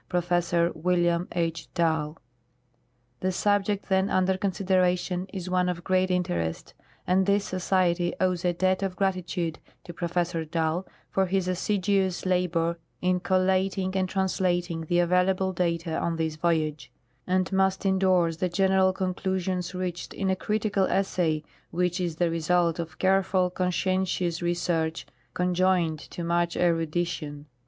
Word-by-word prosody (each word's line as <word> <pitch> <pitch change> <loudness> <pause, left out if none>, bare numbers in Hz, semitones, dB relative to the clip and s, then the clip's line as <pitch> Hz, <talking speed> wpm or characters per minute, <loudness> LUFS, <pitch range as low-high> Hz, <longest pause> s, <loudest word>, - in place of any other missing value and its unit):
Professor 175 -1 +1
William 175 +1 +1
H. 165 -2 -2
Dall. 160 -2 0 1.0
The 185 - 0
subject 205 +1 0
then 190 0 +2
under 185 0 +2
consideration 185 -1 0
is 185 -2 -5
one 180 0 +1
of 175 -1 -4
great 185 +1 +2
interest, 85 - -2 0.3
and 190 +1 +2
this 200 0 +2
Society 180 -2 +1
owes 185 -2 +1
a 180 - +2
debt 185 +2 +1
of 190 -2 -2
gratitude 180 -3 -1 0.2
to 175 - -9
Professor 170 -1 -1
Dall 160 +2 -1 0.2
for 190 -1 +1
his 190 0 0
assiduous 190 0 0
labor 170 -2 +1 0.2
in 180 0 +2
collating 190 +1 +1
and 185 -1 0
translating 175 -3 -1
the 175 - +1
available 180 +2 +2
data 170 -2 -1
on 170 - -1
this 160 -1 -2
voyage, 155 -4 -1 0.4
and 185 0 +1
must 190 0 +1
indorse 185 -4 +2
the 180 +1 0
general 190 +1 +3
conclusions 185 -1 -2
reached 180 -1 -4
in 195 -1 0
a - - +2
critical 205 0 0
essay 175 -6 0 0.3
which 180 +1 0
is 170 -3 -2
the 170 0 +1
result 165 +1 +1
of 165 -1 -5
careful, 190 -1 +2
conscientious 180 -1 0
research 170 -2 -1 0.3
con 180 0 0
joined 175 -3 +2
to 170 - -8
much 170 0 0
erudition. 165 -3 -1
180 Hz, 135 wpm, -27 LUFS, 170-190 Hz, 1.0 s, general